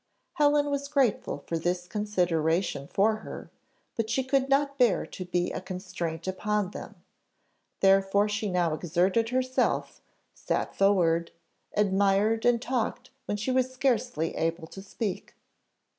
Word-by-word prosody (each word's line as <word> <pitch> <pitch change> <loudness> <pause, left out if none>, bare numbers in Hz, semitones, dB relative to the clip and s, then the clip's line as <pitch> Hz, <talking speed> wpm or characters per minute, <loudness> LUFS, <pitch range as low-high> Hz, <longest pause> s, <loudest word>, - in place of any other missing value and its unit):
Helen 290 -1 +3
was 280 0 -2
grateful 255 - 0
for 165 - -2
this 175 +2 -1
consideration 175 -7 0
for 215 +6 +2
her, 215 - -9 0.4
but 225 -1 -2
she 260 +3 +1
could 270 +1 +1
not 280 0 +1
bear 245 -5 +3
to 185 - -8
be 180 0 -1
a - - -4
constraint 180 -3 -5
upon 205 +1 -1
them, - - -9 0.9
therefore 195 +1 +4
she 210 0 -2
now 175 -3 +1
exerted 180 +8 +1
herself, 255 +1 0 0.3
sat - - -2
forward 170 -4 +3 0.5
admired 200 +2 +2
and 245 -1 +4
talked 245 0 -2
when 205 - -2
she 220 +5 -2
was 255 0 +1
scarcely 245 - 0
able 165 0 -1
to 195 +4 -10
speak. 200 0 -5
200 Hz, 135 wpm, -28 LUFS, 180-245 Hz, 0.9 s, therefore